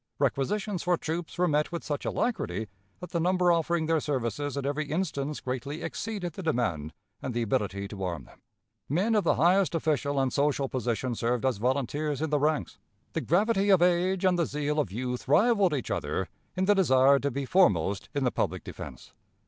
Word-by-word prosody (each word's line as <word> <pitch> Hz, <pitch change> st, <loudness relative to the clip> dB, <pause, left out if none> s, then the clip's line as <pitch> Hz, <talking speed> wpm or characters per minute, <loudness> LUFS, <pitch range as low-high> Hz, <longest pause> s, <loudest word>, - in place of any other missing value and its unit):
Requisitions 195 Hz, +6 st, 0 dB
for 175 Hz, -1 st, +2 dB
troops 165 Hz, +2 st, -4 dB
were 180 Hz, 0 st, +3 dB
met 150 Hz, 0 st, +1 dB
with 170 Hz, -, -4 dB
such 145 Hz, -1 st, -3 dB
alacrity 110 Hz, -, -1 dB, 0.3 s
that 180 Hz, -1 st, -8 dB
the 170 Hz, -, 0 dB
number 180 Hz, +1 st, +3 dB
offering 170 Hz, 0 st, +1 dB
their 160 Hz, 0 st, +2 dB
services 140 Hz, 0 st, -2 dB
in 140 Hz, -, -2 dB
every 145 Hz, +2 st, -1 dB
instance 150 Hz, -3 st, -2 dB
greatly 140 Hz, +5 st, -4 dB
exceeded 180 Hz, 0 st, -4 dB
the 190 Hz, -, -7 dB
demand 110 Hz, -, -1 dB, 0.3 s
and 125 Hz, -3 st, -4 dB
the 120 Hz, -, +1 dB
ability 100 Hz, -4 st, -1 dB
to 100 Hz, -2 st, -6 dB
arm 85 Hz, -3 st, -3 dB
them. -, -, -19 dB, 0.5 s
Men 190 Hz, -, +1 dB
of 210 Hz, -2 st, +3 dB
the 170 Hz, -, +3 dB
highest 180 Hz, +3 st, +3 dB
official 145 Hz, -3 st, 0 dB
and 135 Hz, -2 st, 0 dB
social 140 Hz, -1 st, +1 dB
position 125 Hz, -1 st, -2 dB
served 120 Hz, +2 st, -1 dB
as 130 Hz, -5 st, +1 dB
volunteers 140 Hz, +4 st, -1 dB
in 160 Hz, 0 st, -2 dB
the 150 Hz, -, +3 dB
ranks. 150 Hz, 0 st, 0 dB, 0.3 s
The -, -, -1 dB
gravity 200 Hz, +3 st, +2 dB
of 190 Hz, -3 st, +6 dB
age 180 Hz, +2 st, +2 dB
and 180 Hz, -1 st, +3 dB
the 170 Hz, -, +2 dB
zeal 150 Hz, +1 st, -1 dB
of 120 Hz, -, -1 dB
youth 125 Hz, +4 st, -4 dB
rivaled 195 Hz, -, +4 dB
each 130 Hz, -, -4 dB
other -, -, -2 dB, 0.3 s
in 185 Hz, -, +1 dB
the 205 Hz, -, +5 dB
desire 140 Hz, -7 st, +5 dB
to 140 Hz, -, -1 dB
be 140 Hz, +1 st, -3 dB
foremost 100 Hz, -, +2 dB
in 140 Hz, -, +1 dB
the 125 Hz, -, +2 dB
public -, -, -2 dB
defense. -, -, -9 dB
150 Hz, 195 wpm, -28 LUFS, 130-175 Hz, 0.5 s, of